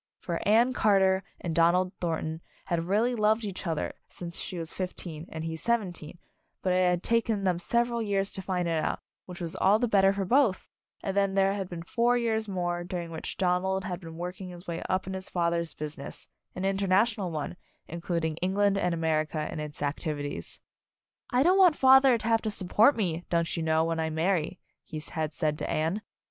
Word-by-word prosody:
For 170 -3 -3
Anne 235 +5 +5
Carter 195 -4 +3 0.2
and 170 - -3
Donald 175 +3 +3
Thornton 160 -1 -2 0.2
had 170 -1 -1
really 220 +6 +2
loved 215 0 +2
each 195 -2 -5
other 160 -2 -2 0.2
since 170 -1 -7
she 180 - -5
was 165 -1 -3
fif 185 -1 -4
teen 160 -1 -6
and 160 0 -6
he 165 0 -3
seventeen, 175 -5 -2 0.5
but 185 - +2
it 185 0 +4
had 175 0 0
taken 230 -3 +1
them 180 -2 +1
several 235 +4 0
years 200 -2 0
to 190 - -2
find 180 -2 -1
it 160 -2 0
out, - - -2 0.3
which 180 -1 -8
was 170 -2 -4
all 200 +3 +5
the 245 +2 +1
better 195 -3 +5
for 200 -1 -2
both, 240 -3 +2 0.4
and 195 - -2
then 195 -1 +2
there 195 0 +3
had 195 -2 -4
been 170 -2 -6
four 240 +7 +2
years 220 -2 0
more 175 -2 -2
during 175 -1 -5
which 160 - -4
Donald 190 +1 +1
had 180 -1 -4
been 165 -1 -9
working 180 +2 -5
his 175 0 -10
way 170 -1 -4
up 185 0 0
in 190 - -5
his 190 0 -5
father's 170 -1 -1
business, 150 -2 -6 0.3
an 185 - -3
international 195 +1 +2
one, 155 0 -4 0.3
including 165 -1 -2
England 195 +2 +2
and 180 -2 +1
America 155 -1 0
in 160 - -5
its 150 -1 -5
activities. 145 0 -3 0.7
"I 250 +2 +3
don't 370 +4 +4
want 360 -5 +7
father 265 -2 +6
to 220 - -5
have 225 -1 +3
to 220 - -2
support 210 +7 +3
me, 175 -5 -1
don't 170 -1 +1
you 165 - -2
know, 160 0 +2
when 165 0 -1
I 160 0 0
marry," 165 +2 0 0.3
he 155 - -6
had 155 -2 -2
said 150 -1 -1
to - - -3
Anne. 165 +7 0
180 Hz, 200 wpm, -28 LUFS, 165-205 Hz, 0.7 s, want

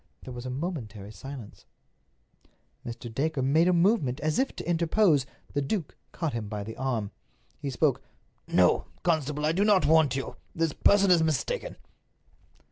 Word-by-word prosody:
There 130 - -8
was 120 +1 -6
a - - -3
momentary 125 - -5
silence. 135 -1 -10 1.2
Mr. 115 0 -7
Dacre 145 +1 -1
made 155 +6 +4
a - - +5
movement 170 - +2
as 155 +1 0
if 270 - 0
to - - -7
interpose. 170 -4 +3 0.3
The 145 - 0
duke 150 +2 -3 0.2
caught 165 -4 -3
him 110 -3 -4
by 105 -1 -4
the 110 +2 -7
arm. 120 -6 -2 0.5
He 140 - -3
spoke: 135 0 +1 0.5
"No, 90 -1 +3 0.2
constable, 150 -4 0
I 155 - +3
do 185 +5 +1
not 205 -3 +4
want 155 -4 +4
you. 135 - -4 0.2
This 165 -2 0
person 200 -2 +4
is 170 -2 +6
mistaken." 480 - -1
150 Hz, 160 wpm, -28 LUFS, 125-170 Hz, 1.2 s, is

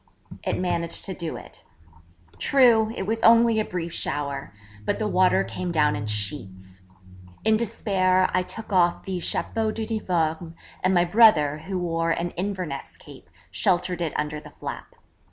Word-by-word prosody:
It - - -1
managed 170 -2 -2
to 190 - -4
do 170 -3 -5
it. - - -14 0.8
True, 235 -5 +4
it - - -3
was 225 +3 -2
only 230 -1 +5
a - - +2
brief 170 -4 -5
shower: 140 -4 -3 0.3
but - - -1
the 215 - -1
water 185 - +3
came 180 - -4
down 150 -3 +2
in 105 +1 -4
sheets. 95 -2 -4 0.6
In 220 0 +5
despair 190 -4 +1
I 185 - +3
took 215 +3 -6
off 175 -2 +3
the 190 -2 -3
chapeau 220 +5 -1
d'uniforme, 175 -7 -2 0.3
and 185 +1 +3
my 175 0 +4
brother, 170 -7 +5
who 185 +4 -5
wore 165 -2 -1
an 170 +1 -1
Inverness 180 -7 -5
cape, 140 -11 -14 0.2
sheltered 175 - 0
it 165 -3 -2
under 150 0 -2
the - - -12
flap. - - -8
180 Hz, 155 wpm, -24 LUFS, 155-205 Hz, 0.8 s, only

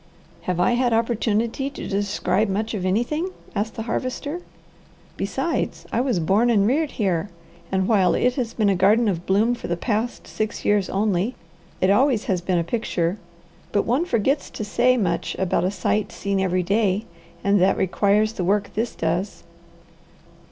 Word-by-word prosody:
"Have 180 -1 0
I 180 - +3
had 240 0 +2
opportunity 230 +3 0
to 280 - -7
describe 200 0 0
much 215 +4 -1
of 185 -3 -2
anything?" 245 - 0 0.2
asked 215 +2 -2
the 225 - -4
Harvester. 260 +8 -3 0.7
"Besides, - - -2
I 235 - +1
was 250 -8 +1
born 195 +9 +3
and 205 -4 +4
reared 290 +6 +1
here, 190 -3 0 0.4
and 190 0 +1
while 195 -5 +3
it 250 0 +2
has 245 -4 -3
been 215 -3 +2
a 195 - +3
garden 210 +5 +4
of 175 -4 -2
bloom 215 +5 +3
for 240 - -6
the 175 - -1
past 225 +4 -2
six 215 0 -4
years 205 -2 +2
only, 205 +3 0 0.5
it 185 - +4
always 245 +1 +3
has 185 -3 -1
been 180 0 0
a 170 - +1
picture; 180 -2 -1 0.5
but 205 - +1
one 260 +9 +1
forgets 275 - 0
to - - -6
say 250 +4 +3
much 185 -7 -1
about 185 -1 +1
a - - +2
sight 210 +1 -1
seen 200 -1 -2
every 185 -1 +1
day 200 +2 +1 0.4
and 200 -1 +3
that 190 +1 +3
requires 205 +3 +2
the 185 - -3
work 200 +3 +1
this 225 +3 -2
does." 175 +5 -2
210 Hz, 175 wpm, -23 LUFS, 190-235 Hz, 0.7 s, and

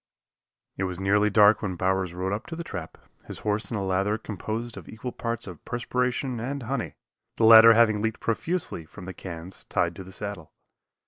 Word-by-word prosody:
It 95 - 0
was 90 -1 -4
nearly 105 +2 +3
dark 105 +1 +5
when 95 -4 -2
Bowers 95 -1 0
rode 95 +2 -2
up 105 +4 -4
to 165 - -6
the 170 - -5
trap, 90 - -7 0.3
his - - -7
horse 105 +1 0
in 115 - -2
a 100 - -2
lather 95 +3 +1
composed 110 +2 -5
of - - -10
equal 115 +3 -6
parts 115 -1 -4
of 90 -5 -10
perspiration 125 +1 -2
and 135 +3 -4
honey, 115 - -3 0.4
the 115 - +3
latter 115 0 +10
having 110 -2 +4
leaked 110 0 -1
profusely 155 - -2
from 90 +4 -12
the 95 - -6
cans 90 0 -8
tied 85 0 0
to 95 - -7
the 95 - -12
saddle. 100 -5 -7
105 Hz, 195 wpm, -26 LUFS, 95-115 Hz, 0.4 s, latter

